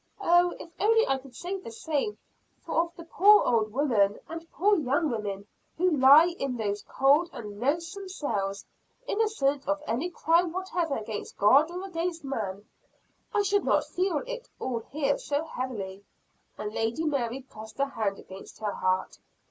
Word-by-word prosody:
"Oh, 350 -2 +4
if 335 - -10
I - - 0
only 450 +1 +5 0.2
could 260 -2 -15
say 375 +7 -4
the 370 - -9
same 310 - -2 0.5
of 335 +1 +1
the 335 - -10
poor 410 +5 +6
old 220 -3 +1
women, 220 -6 +2
and 330 0 -8
poor 410 +4 +3
young 290 -1 +1
women, 200 -3 -4 0.3
now 365 +2 +3
lying 305 +5 +6
in 265 -3 -2
those 205 -2 -2
cold 285 +6 +3
and 205 -2 -8
loathsome 335 - -2
cells 200 - -3 0.4
innocent 405 - 0
of 295 0 +1
any 260 +11 -1
crime 340 0 +2
whatever 355 -5 -2
either 220 - -4
against 210 -1 -6
God 275 +10 +5
or 360 +2 -5
against 335 -2 -3
man 210 -7 -4 0.7
I 415 - +2
should 405 0 +2
not - - +2
feel 365 -3 -1
it - - -7
all 250 -3 -2
here 285 +4 -1
so 290 +1 -1
heavily," 210 -10 -5 0.5
and 210 0 -5
Lady 225 +9 -1
Mary 265 -4 -1
pressed 220 -4 -12
her 275 - +2
hand 215 -7 -2
against 190 +1 -12
her 215 -2 -2
heart. 185 0 -1
285 Hz, 165 wpm, -28 LUFS, 225-350 Hz, 0.7 s, poor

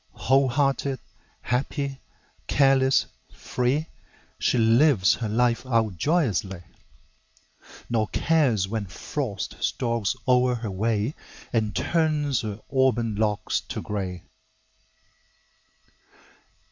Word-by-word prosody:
Whole 135 +1 +2
hearted, 135 0 0 0.4
happy, 135 +2 -2 0.5
careless, 135 -1 +4 0.3
free, 130 +5 -1 0.5
She - - +1
lives 115 -2 +4
her 115 -3 -3
life 120 +2 +1
out 115 -5 +1
joyously, 100 - 0 1.2
Nor 110 -2 0
cares 135 - +1
when 105 -1 -3
Frost 105 +1 -4
stalks 115 -4 0
o'er 125 0 +4
her 115 -3 -4
way 110 +5 0 0.4
And 110 -3 0
turns 150 -5 +1
her 105 -1 -5
auburn 125 -4 +2
locks 105 -2 0
to - - -4
gray. 95 -4 -4
120 Hz, 95 wpm, -25 LUFS, 105-135 Hz, 1.2 s, careless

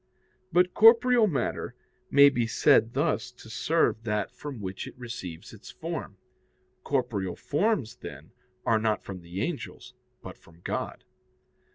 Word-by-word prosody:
But 180 +1 +3
corporeal 230 +1 +6
matter 135 - -2 0.3
may 140 0 +7
be 120 -4 -1
said 115 +1 +3
thus 135 -5 0
to 110 -2 -14
serve 120 -4 +1
that 105 -3 -2
from 145 -5 -8
which 95 -1 -5
it - - -12
receives 105 -9 -8
its - - -13
form. - - -6 0.7
Corporeal 105 -9 -1
forms, 150 - -1
then, 75 - -10 0.3
are 110 - +3
not 110 -1 0
from 95 -2 -8
the 85 +3 -5
angels, 145 -6 -6 0.3
but 95 - -10
from 85 0 -20
God. - - -4
120 Hz, 140 wpm, -27 LUFS, 100-150 Hz, 0.7 s, may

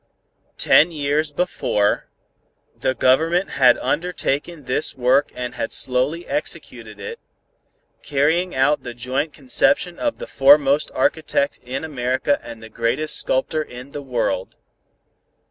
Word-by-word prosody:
Ten 160 - +5
years 150 0 0
before, 145 - 0 0.7
the 130 - -1
Government 160 +10 +2
had 125 -2 +5
undertaken 170 -2 -2
this 130 +4 -2
work 130 +3 +2
and 125 0 -4
had 115 - -4
slowly 135 +7 0
executed 295 - -5
it, 465 0 -7 0.8
carrying 160 +6 +1
out 140 +3 +2
the 120 -2 -8
joint 130 +6 -2
conception 175 - +1
of 295 -1 -1
the - - -6
foremost 140 +1 +4
architect 140 +1 0
in 130 +4 -5
America 130 -1 0
and 115 -1 -10
the - - -9
greatest 115 +8 -1
sculptor 145 +4 0
in 125 -1 -9
the 145 - -6
world. 125 -8 -2
140 Hz, 125 wpm, -21 LUFS, 125-160 Hz, 0.8 s, Ten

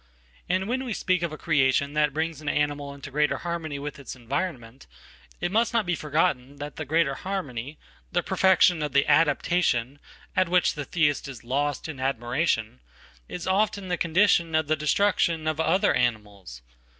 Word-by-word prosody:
And 185 +2 0
when 255 +3 -1
we 245 -4 -3
speak 185 -2 0
of 170 -2 -2
a 155 - -7
creation 140 -3 +1
that 150 -1 +2
brings 160 +1 -3
an 150 - -10
animalinto 145 -1 -2
greater 150 +2 +1
harmony 165 -4 -4
with 145 +1 -6
its 140 - -8
environment, 130 - -5 0.5
it 175 - -2
must 225 +3 +2
not 225 -3 +2
be 175 0 0
forgottenthat 145 -2 -2
the 155 - -4
greater 155 0 +2
harmony, 145 -7 -5 0.3
the 175 - 0
perfection 190 -3 +4
of 150 -3 -3
the 140 0 +4
"adaptation" 145 -3 +2 0.4
atwhich 180 -1 +3
the 145 -1 -5
Theist 150 -2 0
is 130 -5 -9
lost 145 +6 -1
in 155 -4 -7
admiration, 120 - -1 0.5
is 175 - -6
often 195 0 0
the 180 - +1
condition 170 -1 +2
ofthe 155 -1 +2
destruction 165 +1 +1
of 155 0 -1
other 190 +5 +3
animals. 105 - -3
150 Hz, 160 wpm, -26 LUFS, 140-175 Hz, 0.5 s, perfection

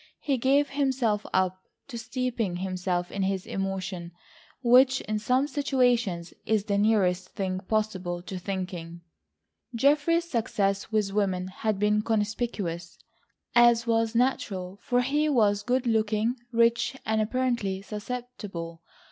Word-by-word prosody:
He 275 -3 -1
gave 275 +4 +3
himself 260 -7 0
up 185 0 +1 0.3
to 265 - -8
steeping 235 -4 -2
himself 180 -1 -2
in 200 - -3
his 190 -1 -1
emotion, 190 -3 -4 0.5
which, 255 +2 +5
in 215 0 -2
some 250 +5 +2
situations, 245 - +1
is 215 -2 +1
the 200 -1 0
nearest 190 -4 +2
thing 185 -3 -2
possible 185 -4 -2
to 185 0 -6
thinking. 180 -3 -5 0.7
Geoffrey's 295 +7 +3
success 205 -6 -1
with 210 -3 0
women 190 -3 0
had 215 +2 -2
been 210 +1 +2
conspicuous, 210 -6 -2 0.6
as 235 -1 +5
was 225 -1 +1
natural 205 -7 -1
for 245 0 +1
he 295 +4 +1
was 210 -7 +3
good 250 +4 0
looking, 220 0 +1 0.2
rich 235 +2 +2
and 220 0 +1
apparently 220 -5 -1
susceptible. 210 -7 -6
215 Hz, 125 wpm, -27 LUFS, 190-245 Hz, 0.7 s, which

